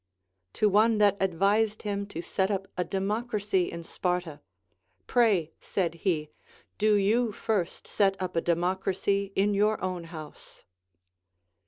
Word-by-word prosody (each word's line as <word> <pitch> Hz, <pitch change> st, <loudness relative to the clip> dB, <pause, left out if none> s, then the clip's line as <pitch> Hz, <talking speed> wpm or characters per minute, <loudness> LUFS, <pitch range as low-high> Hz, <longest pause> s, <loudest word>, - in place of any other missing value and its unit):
To 215 Hz, -, +2 dB
one 215 Hz, +2 st, +4 dB
that 205 Hz, -1 st, +4 dB
ad 190 Hz, -3 st, +1 dB
vised 210 Hz, +4 st, +2 dB
him 200 Hz, -1 st, -2 dB
to 170 Hz, -4 st, -6 dB
set 190 Hz, +3 st, 0 dB
up 195 Hz, -1 st, -2 dB
a 180 Hz, -, 0 dB
democracy 200 Hz, 0 st, -1 dB
in 170 Hz, 0 st, -6 dB
Sparta, 180 Hz, -3 st, -2 dB, 0.7 s
Pray, 205 Hz, -10 st, +2 dB
said 175 Hz, -4 st, -1 dB
he, 165 Hz, -3 st, -1 dB, 0.5 s
do 210 Hz, 0 st, +4 dB
you 215 Hz, +4 st, +2 dB
first 200 Hz, -4 st, -2 dB
set 195 Hz, -1 st, +1 dB
up 185 Hz, -2 st, -4 dB
a 165 Hz, -, +2 dB
democracy 190 Hz, +3 st, 0 dB
in 205 Hz, +2 st, +2 dB
your 210 Hz, +2 st, +2 dB
own 180 Hz, -2 st, -3 dB
house. 155 Hz, -2 st, -11 dB
195 Hz, 140 wpm, -28 LUFS, 180-210 Hz, 0.7 s, one